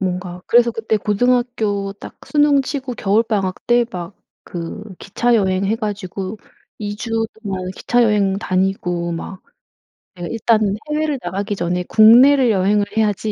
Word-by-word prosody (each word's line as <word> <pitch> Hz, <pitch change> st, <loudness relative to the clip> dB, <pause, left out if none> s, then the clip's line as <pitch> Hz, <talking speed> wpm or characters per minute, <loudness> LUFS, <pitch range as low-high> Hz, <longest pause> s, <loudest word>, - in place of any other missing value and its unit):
뭔가 180 Hz, -1 st, -4 dB
그래서 240 Hz, 0 st, +4 dB
그때 225 Hz, -1 st, -1 dB
고등학교 215 Hz, -2 st, 0 dB
딱 -, -, -12 dB
수능치고 280 Hz, -3 st, +1 dB
겨울방학 205 Hz, -3 st, -1 dB
때 240 Hz, 0 st, +3 dB
막 180 Hz, -2 st, -7 dB, 0.4 s
그 175 Hz, +4 st, -6 dB, 0.2 s
기차 235 Hz, +4 st, 0 dB
여행 190 Hz, -2 st, +1 dB
해가지고 205 Hz, -2 st, -4 dB, 0.4 s
2 205 Hz, -1 st, -5 dB
주 225 Hz, +2 st, -6 dB, 0.3 s
동안 185 Hz, -3 st, -4 dB
기차 245 Hz, 0 st, +1 dB
여행 205 Hz, -3 st, +2 dB
다니고 185 Hz, -3 st, -1 dB
막 185 Hz, +3 st, -7 dB, 0.7 s
'내가 175 Hz, -2 st, -7 dB
일단은 220 Hz, -2 st, +1 dB, 0.2 s
해외를 300 Hz, -2 st, 0 dB
나가기 200 Hz, +3 st, -3 dB
전에 180 Hz, 0 st, -2 dB
국내를 245 Hz, +4 st, +6 dB
여행을 205 Hz, +1 st, +2 dB
해야지.' 215 Hz, -1 st, 0 dB
205 Hz, 290 characters per minute, -19 LUFS, 190-235 Hz, 0.7 s, 국내를